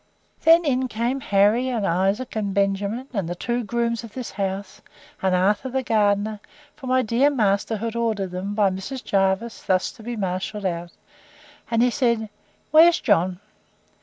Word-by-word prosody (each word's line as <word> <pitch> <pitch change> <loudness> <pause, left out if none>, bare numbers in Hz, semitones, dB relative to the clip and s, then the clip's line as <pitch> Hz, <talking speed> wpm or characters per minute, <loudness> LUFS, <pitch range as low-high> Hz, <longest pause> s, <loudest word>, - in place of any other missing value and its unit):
Then 330 +1 +6
in 260 -2 +1
came 240 +3 -2
Harry, 215 +3 +2
and 230 -5 -1
Isaac, 195 +8 0
and 205 -3 -2
Benjamin, 200 +5 0
and 195 -7 -2
the 175 - -3
two 240 +6 -2
grooms 235 +1 -1
of 225 -2 -11
this 255 -2 -5
house, 195 +1 -4 0.4
and 190 -1 +2
Arthur 205 +7 +1
the 260 +1 -1
gardener; 210 -1 +1 0.4
for 265 - -9
my 255 0 +2
dear 240 +5 +3
master 215 -4 +1
had 225 +2 -4
ordered 220 -5 -1
them, 190 +3 -4
by 205 -3 +3
Mrs. 240 +8 -6
Jervis, 195 +4 0
thus 185 -1 0
to 230 - -15
be 240 +2 -5
marshalled 195 +1 -3
out: 170 -1 -3 0.8
and 230 0 +2
he 250 - +3
said, 235 -4 0 0.4
Where's 330 +3 +7
John? 185 -3 +1
215 Hz, 165 wpm, -23 LUFS, 195-240 Hz, 0.8 s, Where's